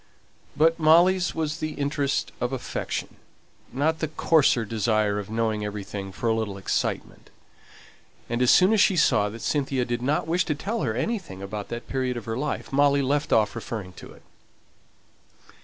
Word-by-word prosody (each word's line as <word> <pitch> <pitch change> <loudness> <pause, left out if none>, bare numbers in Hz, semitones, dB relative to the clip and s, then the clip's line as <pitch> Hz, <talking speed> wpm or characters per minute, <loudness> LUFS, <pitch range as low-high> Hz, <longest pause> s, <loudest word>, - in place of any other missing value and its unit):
But 165 +2 +3
Molly's 175 +4 +4
was 155 -1 -2
the 155 0 -3
interest 140 -1 -1
of 125 - -1
affection, 130 - -4 0.5
not 155 +5 0
the 155 - -1
coarser 150 -6 +2
desire 105 -1 0
of 100 - -7
knowing 110 -1 -1
everything 100 -1 -5
for 115 - -4
a 115 - +3
little 110 -3 -3
excitement; 95 - -3 1.0
and 120 +1 -2
as 125 - +4
soon 190 +4 +6
as 215 - +4
she 195 - +4
saw 105 -9 +3
that 115 +2 -9
Cynthia 135 -3 0
did 120 0 -3
not 140 +5 0
wish 175 +3 +2
to 150 - -1
tell 210 +10 -3
her 110 -5 -1
anything 130 - -3
about 100 +1 -5
that 120 0 -6
period 130 -2 -2
of 115 - -7
her 115 - -3
life, 140 +1 -4
Molly 140 0 +3
left 145 +2 0
off 105 -2 +3
referring 110 -5 -6
to - - -12
it. - - -19
125 Hz, 175 wpm, -25 LUFS, 110-155 Hz, 1.0 s, soon